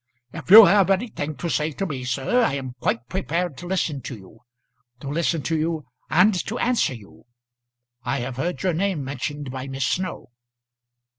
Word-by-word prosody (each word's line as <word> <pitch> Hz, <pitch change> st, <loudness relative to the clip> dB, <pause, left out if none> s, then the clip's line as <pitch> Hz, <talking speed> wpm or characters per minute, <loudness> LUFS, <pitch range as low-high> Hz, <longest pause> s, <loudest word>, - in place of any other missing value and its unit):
"If -, -, -9 dB
you 215 Hz, +2 st, +12 dB
have 195 Hz, +1 st, +4 dB
anything 190 Hz, -7 st, -1 dB
to 170 Hz, -, -4 dB
say 155 Hz, -1 st, -1 dB
to 195 Hz, -, -3 dB
me, 140 Hz, -7 st, -5 dB
sir, 135 Hz, -, +1 dB
I 185 Hz, -, +1 dB
am 130 Hz, -2 st, -5 dB
quite 115 Hz, +1 st, -1 dB
prepared 175 Hz, -1 st, -2 dB
to 175 Hz, -, -8 dB
listen 165 Hz, -6 st, -1 dB
to 120 Hz, 0 st, -7 dB
you 95 Hz, +3 st, -16 dB, 0.6 s
to 135 Hz, -, -9 dB
listen 165 Hz, 0 st, 0 dB
to 165 Hz, -, -1 dB
you, 160 Hz, -1 st, -2 dB, 0.2 s
and 185 Hz, +6 st, +5 dB
to 225 Hz, -, -3 dB
answer 240 Hz, -, +1 dB
you. 105 Hz, -1 st, -16 dB, 0.8 s
I 125 Hz, +1 st, -1 dB
have 125 Hz, 0 st, -5 dB
heard 175 Hz, +6 st, -3 dB
your 185 Hz, -2 st, +1 dB
name 180 Hz, -3 st, -1 dB
mentioned 145 Hz, +1 st, -5 dB
by 130 Hz, +1 st, -6 dB
Miss 135 Hz, -1 st, -2 dB
Snow." 185 Hz, -6 st, -3 dB
155 Hz, 180 wpm, -23 LUFS, 135-185 Hz, 0.8 s, you